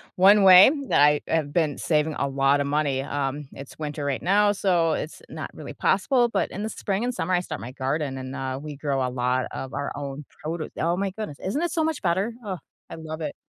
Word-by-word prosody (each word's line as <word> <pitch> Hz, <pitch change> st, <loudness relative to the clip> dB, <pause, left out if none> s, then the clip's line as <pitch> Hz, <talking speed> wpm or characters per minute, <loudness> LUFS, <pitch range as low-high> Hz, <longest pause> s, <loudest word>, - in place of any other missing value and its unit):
1 200 Hz, +2 st, +6 dB
way 190 Hz, +4 st, +9 dB, 0.2 s
that -, -, +4 dB
I 150 Hz, 0 st, +5 dB
have 155 Hz, -3 st, 0 dB
been 155 Hz, -3 st, 0 dB
saving 155 Hz, -1 st, +1 dB
a 140 Hz, -, 0 dB
lot 135 Hz, +1 st, +2 dB
of 140 Hz, -, -1 dB
money 140 Hz, -2 st, 0 dB
um, 140 Hz, +1 st, -3 dB
it's 140 Hz, +2 st, -11 dB
winter 150 Hz, -1 st, -4 dB
right 140 Hz, -2 st, -1 dB
now, 205 Hz, +3 st, +3 dB
so 175 Hz, -5 st, +2 dB
it's 155 Hz, -, -5 dB
not -, -, -6 dB
really -, -, -8 dB
possible, 245 Hz, -3 st, +2 dB
but -, -, -1 dB
in 205 Hz, -, -5 dB
the 220 Hz, -, -2 dB
spring 200 Hz, 0 st, -2 dB
and 250 Hz, 0 st, -1 dB
summer, 185 Hz, -5 st, -2 dB
I 180 Hz, -, +4 dB
start 160 Hz, -3 st, -6 dB
my 120 Hz, -, -7 dB
garden, 135 Hz, +1 st, -2 dB
and, 130 Hz, +1 st, -6 dB
uh, 130 Hz, -1 st, -3 dB
we 150 Hz, -1 st, -7 dB
grow 140 Hz, -2 st, -1 dB
a -, -, -1 dB
lot 125 Hz, +1 st, 0 dB
of 135 Hz, 0 st, -6 dB
our 140 Hz, 0 st, -3 dB
own 140 Hz, 0 st, -6 dB, 0.2 s
produce 160 Hz, +1 st, -4 dB
oh 170 Hz, +2 st, +1 dB
my 195 Hz, +1 st, 0 dB
goodness, 210 Hz, -10 st, -6 dB
isn't 260 Hz, -, -1 dB
it 345 Hz, -, -1 dB
so 325 Hz, -1 st, 0 dB
much 315 Hz, -1 st, -1 dB
better? 190 Hz, +7 st, 0 dB
Oh, 190 Hz, -3 st, -3 dB, 0.3 s
I -, -, -7 dB
love 160 Hz, 0 st, -7 dB
it. 155 Hz, -, -4 dB
155 Hz, 235 wpm, -25 LUFS, 140-190 Hz, 0.3 s, way